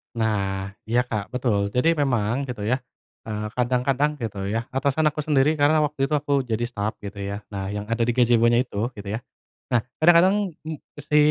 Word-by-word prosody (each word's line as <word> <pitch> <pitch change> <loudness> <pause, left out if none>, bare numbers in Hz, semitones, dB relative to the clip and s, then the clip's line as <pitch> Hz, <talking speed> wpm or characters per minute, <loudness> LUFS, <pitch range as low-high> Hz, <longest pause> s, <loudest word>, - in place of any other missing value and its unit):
Nah, 100 -4 -1 0.2
iya 120 +2 +2
Kak, 110 -2 -5
betul. 115 -6 +1
Jadi 125 +6 +4
memang, 125 -1 +1
gitu, 125 -5 -5
ya, 120 +5 +1 0.5
eee, 105 -1 -3
kadang-kadang, 125 +5 +1
gitu, 100 -3 -3
ya, 110 +3 -1
atasan 140 +3 +1
aku 150 - -14
sendiri, 150 0 +2
karena 150 +2 +4
waktu 145 -2 0
itu 150 - -1
aku 140 -2 +1
jadi 115 0 -1
staff 105 -2 -2
gitu, 100 0 -7
ya. 100 +1 -4
Nah, 100 -2 -4
yang 105 - -3
ada 115 0 +1
di 120 - +1
gazebonya 120 -1 +4
itu 120 0 -4
gitu, 100 -2 -8
ya. 110 - -1 0.5
Nah, 120 -4 +1 0.2
kadang-kadang 180 +2 +4
em 160 - -3
eee, 145 - -14
si 150 0 +2
120 Hz, 190 wpm, -24 LUFS, 105-145 Hz, 0.5 s, Jadi